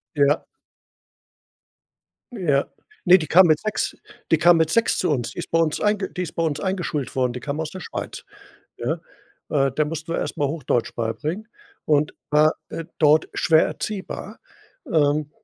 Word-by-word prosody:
Ja. 145 Hz, +1 st, +3 dB, 1.9 s
Ja. 150 Hz, -, +1 dB, 0.4 s
Ne, 185 Hz, 0 st, +7 dB
die 155 Hz, -, -4 dB
kam 180 Hz, +4 st, +7 dB
mit 155 Hz, -2 st, +4 dB
6 215 Hz, -1 st, -2 dB, 0.3 s
die 165 Hz, -, +6 dB
kam 175 Hz, +1 st, +6 dB
mit 160 Hz, -1 st, +2 dB
6 230 Hz, -, +2 dB
zu 180 Hz, -, +1 dB
uns. 125 Hz, -5 st, -1 dB
Die -, -, -12 dB
ist 170 Hz, -, -5 dB
bei 165 Hz, -, +2 dB
uns 160 Hz, -2 st, +1 dB
einge 210 Hz, -2 st, 0 dB
die 180 Hz, -, -4 dB
ist 170 Hz, -, -5 dB
bei 165 Hz, -, -1 dB
uns 155 Hz, -3 st, -1 dB
eingeschult 180 Hz, -8 st, -2 dB
worden, 125 Hz, -1 st, +1 dB
die 125 Hz, -, -6 dB
kam 145 Hz, +2 st, -4 dB
aus 155 Hz, -, -3 dB
der 185 Hz, -, -8 dB
Schweiz, -, -, -6 dB, 0.5 s
ne? -, -, -2 dB, 0.5 s
Äh, 135 Hz, -2 st, +2 dB
der 155 Hz, +3 st, +1 dB
mussten 160 Hz, +1 st, -5 dB
wir -, -, -1 dB
erst -, -, -3 dB
mal 145 Hz, -, +1 dB
Hochdeutsch 145 Hz, -6 st, -1 dB
beibringen, 120 Hz, -, -3 dB, 0.4 s
und 150 Hz, 0 st, +2 dB, 0.2 s
war, 150 Hz, +1 st, +4 dB
äh, 165 Hz, -, -6 dB
dort 155 Hz, 0 st, +4 dB
schwer 160 Hz, -1 st, +4 dB
erziehbar, 205 Hz, -3 st, -6 dB, 0.5 s
ähm, 150 Hz, -1 st, +2 dB
155 Hz, 175 wpm, -23 LUFS, 145-175 Hz, 1.9 s, Ne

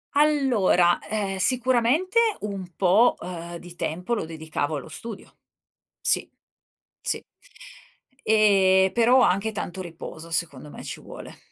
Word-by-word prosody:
Allora, 265 Hz, -12 st, +3 dB
ehm, 200 Hz, -3 st, -2 dB
sicuramente 255 Hz, -, +1 dB, 0.2 s
un 195 Hz, -4 st, -6 dB
po', 200 Hz, +6 st, +4 dB
ehm, 175 Hz, -1 st, -7 dB
di 175 Hz, 0 st, -11 dB
tempo 180 Hz, +10 st, -3 dB
lo 210 Hz, -, -1 dB
dedicavo 160 Hz, -2 st, -3 dB
allo 140 Hz, -, -7 dB
studio. 225 Hz, -3 st, -9 dB, 0.7 s
Sì. -, -, 0 dB, 0.7 s
Sì. -, -, -2 dB, 1.0 s
Ehm, 195 Hz, -3 st, +4 dB
però 240 Hz, +2 st, +4 dB
anche 200 Hz, +2 st, +2 dB
tanto 190 Hz, -2 st, -5 dB
riposo 165 Hz, -1 st, -9 dB
secondo 150 Hz, -4 st, -3 dB
me -, -, -10 dB
ci -, -, -6 dB
vuole. -, -, -11 dB
190 Hz, 120 wpm, -25 LUFS, 175-230 Hz, 1.0 s, po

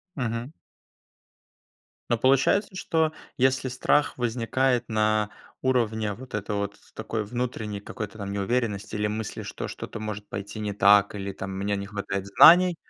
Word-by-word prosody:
Мгм. 120 Hz, 0 st, -3 dB, 1.6 s
Но 120 Hz, -, +2 dB
получается 135 Hz, -, +3 dB
что 160 Hz, -3 st, 0 dB, 0.2 s
если 130 Hz, 0 st, +2 dB
страх 145 Hz, +3 st, +1 dB
возникает 125 Hz, +1 st, 0 dB
на 110 Hz, -1 st, +2 dB, 0.3 s
уровне 110 Hz, -5 st, +1 dB
вот 125 Hz, +4 st, -12 dB
этой 105 Hz, 0 st, -2 dB
вот, 100 Hz, 0 st, -2 dB, 0.2 s
такой 110 Hz, 0 st, -3 dB
внутренней 110 Hz, -2 st, -3 dB
какой-то 105 Hz, -2 st, -7 dB
там 100 Hz, -1 st, -5 dB
неуверенности 105 Hz, 0 st, -1 dB
или 105 Hz, 0 st, 0 dB
мысли 110 Hz, 0 st, -4 dB
что -, -, -5 dB
что-то 115 Hz, -, -7 dB
может 105 Hz, -1 st, -5 dB
пойти 100 Hz, +2 st, -6 dB
не 105 Hz, -1 st, -2 dB
так 100 Hz, +1 st, +5 dB
или 100 Hz, -1 st, -4 dB
там 95 Hz, 0 st, -6 dB
у -, -, -5 dB
меня 100 Hz, +1 st, -1 dB
не 100 Hz, 0 st, -4 dB
хватает 100 Hz, -1 st, -4 dB
знаний 175 Hz, -, +7 dB
110 Hz, 150 wpm, -26 LUFS, 100-125 Hz, 1.6 s, знаний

